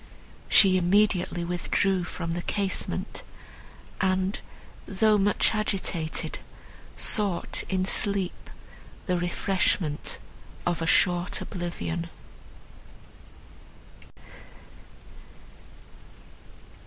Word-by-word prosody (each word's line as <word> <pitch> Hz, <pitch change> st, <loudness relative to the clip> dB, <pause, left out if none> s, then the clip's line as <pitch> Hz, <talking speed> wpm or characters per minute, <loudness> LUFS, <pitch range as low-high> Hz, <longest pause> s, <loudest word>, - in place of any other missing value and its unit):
She 185 Hz, -2 st, +6 dB
immediately 180 Hz, -1 st, +2 dB
withdrew 180 Hz, +1 st, 0 dB
from 165 Hz, -1 st, -5 dB
the 175 Hz, +1 st, -2 dB
casement, 195 Hz, +1 st, -3 dB, 0.8 s
and, 190 Hz, +1 st, 0 dB, 0.5 s
though 210 Hz, +2 st, +3 dB
much 205 Hz, +3 st, +2 dB
agitated, 190 Hz, -6 st, -2 dB, 0.6 s
sought 200 Hz, -6 st, +1 dB
in 185 Hz, -1 st, 0 dB
sleep 195 Hz, -1 st, +2 dB, 0.6 s
the 180 Hz, -, 0 dB
refreshment 175 Hz, -3 st, -1 dB, 0.5 s
of 175 Hz, -1 st, -1 dB
a 165 Hz, -, -1 dB
short 175 Hz, 0 st, +3 dB
oblivion. 175 Hz, -2 st, -4 dB
185 Hz, 70 wpm, -26 LUFS, 175-200 Hz, 0.8 s, She